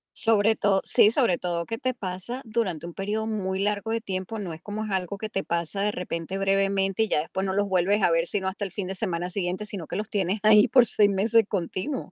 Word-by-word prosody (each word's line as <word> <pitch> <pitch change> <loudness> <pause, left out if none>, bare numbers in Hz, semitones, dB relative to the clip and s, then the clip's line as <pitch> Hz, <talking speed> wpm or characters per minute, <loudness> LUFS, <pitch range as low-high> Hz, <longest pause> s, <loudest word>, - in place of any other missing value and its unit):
Sobre 220 -1 +3
todo 195 -2 +2
sí, 210 - +5
sobre 230 -9 +2
todo 170 -1 -2
que 225 - -4
te 255 +2 -1
pasa 200 +4 -5
durante 215 -8 -2
un 175 - -7
periodo 210 +4 -2
muy 190 -3 -2
largo 205 +2 -1
de 230 0 -1
tiempo, 195 +1 -4
no 180 -5 -5
es 160 - -11
como 210 +3 -5
es 215 - -5
algo 190 +1 -2
que 215 +1 -5
te 195 -1 -2
pasa 170 +3 -2
de 210 - +1
repente 180 -1 -4
brevemente, 195 +1 +1
y 220 - -2
ya - - +2
después 190 +4 -4
no 190 - -1
los 205 0 +1
vuelves 190 +3 +2
a 175 - +4
ver, 165 0 +2
sino 190 +1 -2
hasta 200 +2 -3
el 195 - -7
fin 195 0 -4
de 190 - -4
semana 175 -1 -2
siguiente, 185 +2 -2
sino 195 -6 -6
que - - -5
los 210 +1 -3
tienes 195 0 -1
ahí 215 +1 +7
por 250 0 +5
6 210 -1 +3
meses 215 +3 +3
continuos. 195 - -3
195 Hz, 250 wpm, -26 LUFS, 185-215 Hz, -, ahí